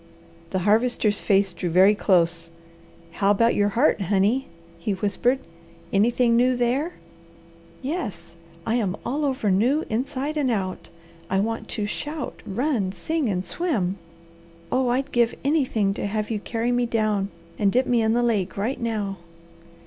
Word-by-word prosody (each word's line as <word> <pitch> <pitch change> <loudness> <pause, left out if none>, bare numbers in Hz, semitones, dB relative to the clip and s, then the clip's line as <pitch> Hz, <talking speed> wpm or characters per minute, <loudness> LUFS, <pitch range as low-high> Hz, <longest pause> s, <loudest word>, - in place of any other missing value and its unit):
The 190 - -1
Harvester's 215 -1 +2
face 195 -2 +2
drew 175 0 -3
very 190 +5 +6
close. 170 -5 +2 0.6
"How 195 +3 +1
about 230 +3 +4
your 205 0 +2
heart, 230 0 +2
honey?" 205 +8 +1 0.3
he 200 +4 -1
whispered. 205 +7 +1 0.6
"Anything 235 +3 +3
new 250 +2 +3
there?" 260 +8 0 0.9
"Yes, 205 - -4 0.3
I 225 +2 +1
am 205 -4 -1
all 290 +4 -1
over 260 -7 0
new 250 - +2
inside 270 +6 -2
and 280 -4 +1
out. 190 -5 -2 0.4
I 190 - +1
want 225 +3 -2
to 210 - -3
shout, 295 +7 -5
run, 215 -2 0
sing, 270 - -2
and 185 -1 -1
swim. 200 - -1 0.7
Oh 255 -1 +2
I'd 265 +3 0
give 235 -1 +2
anything 255 -9 +1
to 200 - -3
have 215 +1 -2
you 215 - -1
carry 230 +3 -2
me 245 0 +1
down 215 -3 0 0.3
and 200 -2 +3
dip 255 +4 +2
me 240 -2 +2
in 220 0 +2
the 240 +1 +2
lake 205 -6 0
right 230 +7 -2
now." 210 -4 -2
220 Hz, 155 wpm, -24 LUFS, 195-250 Hz, 0.9 s, very